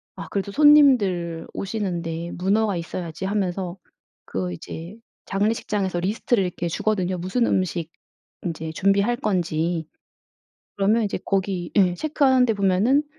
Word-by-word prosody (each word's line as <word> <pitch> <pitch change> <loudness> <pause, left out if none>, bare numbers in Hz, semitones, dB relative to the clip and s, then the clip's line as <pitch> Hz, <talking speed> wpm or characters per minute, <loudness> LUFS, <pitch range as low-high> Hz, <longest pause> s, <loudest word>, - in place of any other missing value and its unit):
"아 - - -7
그래도 200 0 -2
손님들 210 - +4
오시는데 175 -5 -3
문어가 200 +3 +1
있어야지." 170 +1 -5
하면서 190 -2 -2 0.5
그 90 -1 -3
이제 165 - -8 0.3
장례식장에서 200 -2 -1
리스트를 200 +3 +1
이렇게 175 -1 -3
주거든요. 185 +1 -1
무슨 190 +8 0
음식 170 -3 -1 0.6
이제 160 -1 -4
준비할 200 +6 +2
건지. 170 - -1 0.9
그러면 210 +3 +2
이제 205 - -2
거기 190 -3 -1
예 185 -4 +4
체크하는데 260 - +3
보면은 200 +8 +3
190 Hz, 310 characters per minute, -23 LUFS, 175-210 Hz, 0.9 s, 손님들